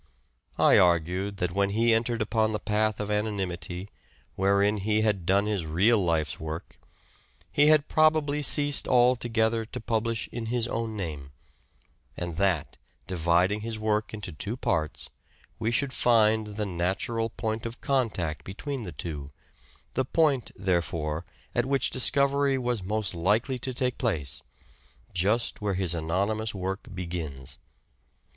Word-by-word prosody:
I - - +6
argued 90 +3 +2
that 90 -2 -1
when 100 +2 +1
he 115 +3 +3
entered 115 0 +1
upon 110 0 +1
the 105 - -1
path 105 0 0
of 105 0 -3
anonymity, 95 -3 -2 0.5
wherein 100 +2 +2
he 105 +2 +1
had 100 -6 0
done 100 +2 +3
his 105 -4 -1
real 95 +7 +3
life's 80 -3 0
work, 80 +1 -7 0.7
he 145 +1 +4
had 155 -1 +5
probably 155 -2 +3
ceased 145 0 +4
altogether 120 -2 +2
to - - -7
publish 115 0 -1
in 115 -2 -5
his 120 0 0
own 115 -2 -3
name; 75 -7 -5 0.8
and 85 -2 -4
that, 95 -5 0 0.3
dividing 90 +4 +1
his 115 0 -4
work 110 0 0
into 105 -4 -6
two 100 +9 -5
parts, 80 -9 -2 0.5
we 110 - 0
should 130 +3 +1
find 110 -3 +3
the 105 - -1
natural 95 +5 -1
point 110 +1 -3
of 115 +2 -9
contact 105 - -1
between 135 +8 -5
the 90 - -6
two, 75 -5 -6 0.6
the 130 - +1
point, 140 -2 +1
therefore, 85 -4 -1 0.3
at 120 +1 +1
which 135 -1 +2
discovery 140 +1 +3
was 120 -4 -1
most 105 +1 -2
likely 105 +9 +1
to 130 - -3
take 125 -1 -2
place, 80 - -1 0.7
just 105 +8 +1
where 100 -2 -1
his 90 -2 +1
anonymous 100 +7 -1
work 95 +1 -4
begins. 80 -7 -6
105 Hz, 140 wpm, -27 LUFS, 90-115 Hz, 0.8 s, I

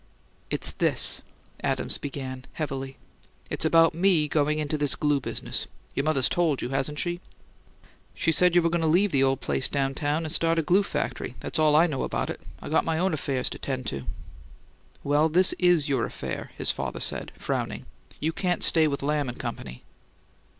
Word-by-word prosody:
"It's - - -2
this," - - 0 0.4
Adams - - 0
began, 130 -2 -6
heavily. 135 -3 -4 0.5
"It's - - -2
about 165 0 +5
me 170 -3 +3
going 150 0 +1
into 150 0 -1
this 145 -2 +1
glue 145 -1 +1
business. - - -3 0.3
Your 140 - -1
mother's 145 -5 +3
told 165 -6 +1
you, 120 - -3
hasn't 135 +2 -1
she?" 175 +2 -2 0.9
"She 165 - +1
said 180 +2 +4
you 175 - +5
were 170 - +1
goin' 170 0 0
to 160 - +1
leave 180 +5 +3
the 135 - +2
old 135 0 +2
place 130 - -1
down 135 -1 0
town 150 +3 -1
and 155 - -3
start 165 +1 +2
a 165 - +2
glue 180 +6 +4
factory. 200 - -3
That's - - -2
all 155 -1 +4
I 160 +3 +6
know 145 -6 -2
about - - -2
it; - - -8 0.2
I - - -6
got 160 - +2
my 160 -1 -1
own 185 +1 +1
affairs 135 -4 -1
to - - -6
'tend 130 -2 -4
to." 70 -2 -6 1.0
"Well, 145 +3 +3
this 180 +4 +6
is 175 -5 +4
your 135 -5 +1
affair," - - -6
his - - +1
father - - -4
said, - - 0
frowning. - - -3 0.3
"You 160 +2 -1
can't 180 0 -1
stay 160 -2 +5
with 140 -2 -3
Lamb 145 -2 0
and 120 - -7
Company." 65 -1 -6
150 Hz, 190 wpm, -26 LUFS, 135-165 Hz, 1.0 s, I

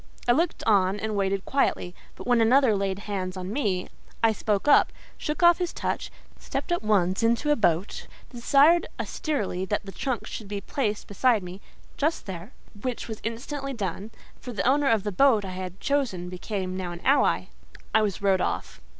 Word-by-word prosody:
I - - +6
looked 320 +7 +1
on 200 -2 +3
and 215 0 -2
waited 195 -1 0
quietly; 270 -9 0 0.2
but - - -10
when 245 -2 +3
another 245 0 +5
laid 195 -1 -1
hands 185 -2 -3
on 185 +2 -5
me, 200 -9 -1 0.4
I 225 - +6
spoke 210 +1 -1
up, 290 - +6 0.2
shook 300 +3 -3
off 345 0 +7
his 355 -1 -2
touch, - - -3 0.3
stepped - - -4
at 345 - +1
once 195 -3 +2
into 235 +6 +2
a - - +5
boat, 185 - 0 0.2
desired 280 +7 +4
austerely 210 - -2
that 205 +2 -2
the 195 - -7
trunk 255 +3 -3
should 215 - -7
be 205 0 -3
placed 210 0 -2
beside 220 +1 +2
me—"Just 200 - -5
there,"—which 205 +5 -7
was 220 -2 -7
instantly 275 +4 -4
done; 200 -2 -4 0.3
for 250 - -7
the 230 - -1
owner 280 +2 +3
of 225 -4 +2
the 210 - -2
boat 220 0 +4
I 190 - -5
had 185 0 -6
chosen 235 -12 -1
became 185 0 -4
now 185 -2 -4
an 170 - -9
ally: 275 +2 +3 0.4
I 220 - +5
was 205 -1 -2
rowed 190 -2 +3
off. - - -3
215 Hz, 180 wpm, -26 LUFS, 190-260 Hz, 0.4 s, off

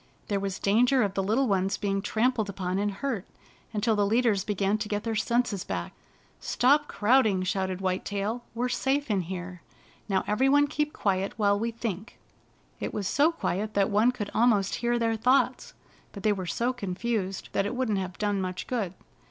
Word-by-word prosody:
There 200 -1 +1
was 195 -1 -3
danger 245 +5 +3
of 200 -2 -1
the 195 - 0
little 225 +8 +1
ones 195 -1 +1
being 195 -1 -1
trampled 220 0 0
upon 185 -1 -2
and 205 +1 +1
hurt 225 -1 -3 0.5
until 220 +1 +1
the 205 - +2
leaders 215 -1 +2
began 205 +1 0
to 215 - -3
get 205 -1 -2
their 230 - -2
senses 225 -3 0
back. 90 -2 -4 0.5
"Stop 290 +4 +3
crowding!" 215 -4 +3
shouted 190 0 -1
White 185 -1 -1
Tail. 205 +4 -3
" - - -35
We're 245 +2 0
safe 270 +1 0
in 195 -2 +2
here! 180 0 -6 0.5
Now 190 -1 +1
every 255 +6 +2
one 290 +1 +5
keep 300 +1 -1
quiet 195 -5 -1
while 205 -2 +2
we 230 +2 -1
thinks 225 -2 -5 0.4
' - - -36
It - - -4
was 200 -3 -2
so 290 +9 +3
quiet 215 - -3
that 200 +1 +2
one 215 +5 +4
could 210 -5 -5
almost 215 -4 +3
hear 240 0 +1
their 230 -1 +1
thoughts, 250 +5 +1 0.4
but 200 - -9
they 215 - +3
were 190 -3 -5
so 235 +8 0
confused 200 -2 -3
that 195 - 0
it 245 - -4
wouldn't 235 -6 0
have 185 -1 -5
done 205 -2 0
much 185 -1 -4
good. 205 -8 -2
210 Hz, 195 wpm, -27 LUFS, 195-240 Hz, 0.5 s, one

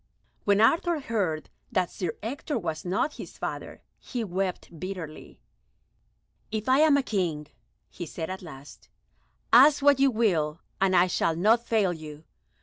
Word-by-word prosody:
When 205 0 +4
Arthur 330 +7 +3
heard 195 - -2 0.2
that 185 -6 0
Sir 180 -4 -3
Ector 280 +4 -3
was 160 -6 -4
not 190 +12 -1
his - - -9
father, - - -6 0.2
he 245 -3 -4
wept 185 -4 -4
bitterly. 180 -4 -7 1.1
"If 220 +1 -4
I 260 +2 +4
am 305 -2 +5
King," 175 -10 -2 0.4
he 175 - -8
said 160 +1 -5
at 190 - -6
last, 145 -5 -12 0.6
"ask 280 +4 +7
what 285 -1 +5
you 275 0 +5
will, 170 -10 +1 0.2
and 190 -1 +3
I 175 0 +6
shall 165 -2 0
not 225 +7 +3
fail 210 -6 +2
you. 155 -2 -10
190 Hz, 145 wpm, -27 LUFS, 165-235 Hz, 1.1 s, ask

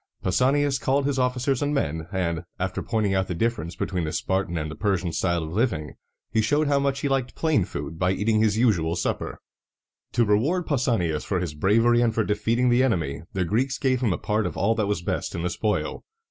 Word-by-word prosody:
Pausanias 135 +7 +2
called 135 +1 +1
his 140 -2 0
officers 125 +1 0
and 145 +1 0
men, 80 - -1
and, 85 -4 -1
after 95 0 -2
pointing 105 -3 0
out 95 0 +1
the 90 - -3
difference 105 -4 -1
between 90 -3 -2
the 80 - -2
Spartan 95 -1 -1
and 80 -1 -3
the - - -7
Persian 95 -5 0
style 85 0 0
of 80 +1 -6
living, 90 - 0 0.4
he 110 - +2
showed 145 +7 +2
how 140 -1 +3
much 140 -1 0
he - - 0
liked 135 -2 -1
plain 155 - +2
food 75 -2 -6
by 90 0 +2
eating 110 +3 +1
his 110 -1 +2
usual 90 -9 +2
supper. - - -2 0.8
To 120 -1 +3
reward 140 - +2
Pausanias 115 - 0
for 95 - -1
his 85 -4 -3
bravery 115 +9 +3
and 115 -2 +1
for 110 - +2
defeating 115 +4 +1
the 120 +1 +4
enemy, 85 - 0
the 95 -2 0
Greeks 130 +8 0
gave 130 -2 +1
him 115 -5 +2
a 90 - 0
part 105 0 0
of - - -6
all 110 +3 +2
that 110 -3 -1
was 100 -4 -1
best - - -2
in 85 - -3
the 90 - -1
spoil. 105 -1 -2
105 Hz, 215 wpm, -25 LUFS, 90-125 Hz, 0.8 s, the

